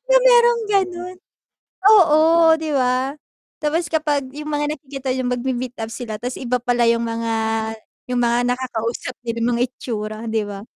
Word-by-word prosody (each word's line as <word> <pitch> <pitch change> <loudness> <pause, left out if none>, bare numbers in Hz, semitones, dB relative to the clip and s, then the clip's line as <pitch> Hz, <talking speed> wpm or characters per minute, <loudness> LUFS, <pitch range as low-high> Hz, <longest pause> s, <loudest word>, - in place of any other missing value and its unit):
'Di - - -13
ba - - +8
mayrong 475 -1 +5
gano'n? 365 -2 -1 0.7
Oo, 335 -8 +6 0.4
'di 315 -1 -4
ba? 255 +1 +1 0.5
Tapos 325 +3 0
kapag 305 -3 0
yung 300 +1 -6
mga 295 0 0
nakikita 275 -1 -8
yung 255 -1 -2
magmi-meet 250 0 -3
up 220 - -4
sila 220 -3 -6
ta's 250 +1 -4
iba 250 -1 -1
pala 245 -1 +2
yung 230 0 +1
mga 230 0 -2 0.8
yung 250 - 0
mga 240 +1 +2
nakakausap 245 -1 -4
nila, 230 -1 -3
yung 235 - +2
mga 240 - +1
itsura 215 -4 -5
'di 220 -1 0
ba? 200 -1 -7
255 Hz, 165 wpm, -20 LUFS, 235-310 Hz, 0.8 s, ba